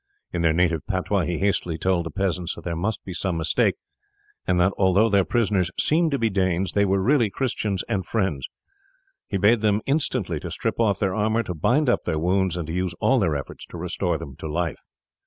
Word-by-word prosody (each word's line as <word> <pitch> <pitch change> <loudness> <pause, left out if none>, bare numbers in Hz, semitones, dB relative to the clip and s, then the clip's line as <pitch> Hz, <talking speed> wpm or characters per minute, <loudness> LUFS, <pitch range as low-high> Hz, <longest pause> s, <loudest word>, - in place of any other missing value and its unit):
In - - -1
their 85 -1 +3
native 85 -1 +1
patois 95 -1 0
he 85 0 -2
hastily 95 -4 0
told 85 0 0
the - - -5
peasants 90 0 -2
that - - -11
there 85 -1 -3
must 100 +6 -2
be 95 - -6
some 90 -1 -1
mistake, 80 -1 +1 0.7
and 90 -1 +2
that 95 +3 +3
although 100 +3 +3
their 100 -2 +4
prisoners 100 -5 +1
seemed 165 +2 +3
to 140 - 0
be 115 - +1
Danes 95 -2 0
they 100 0 +2
were 95 0 +2
really 120 +2 +3
Christians 105 -5 -2
and 100 -5 -1
friends. 95 - -1 0.8
He 100 - -1
bade 105 +4 +4
them 105 -2 +3
then 135 - +2
instantly 115 - -1
to - - -6
strip - - -3
off 105 -5 +2
their 95 -2 0
armour, 110 +2 +1
to 90 - -4
bind 125 - +2
up 120 - +1
their 80 -3 -1
wounds, 90 +2 +1
and 85 - -3
to 80 - -5
use 90 -1 -2
all 135 - +3
their 85 -8 +1
efforts 70 - -6
to - - -9
restore 85 0 -1
them 75 -4 -9
to - - -6
life. 80 +1 -2
95 Hz, 220 wpm, -24 LUFS, 85-105 Hz, 0.8 s, their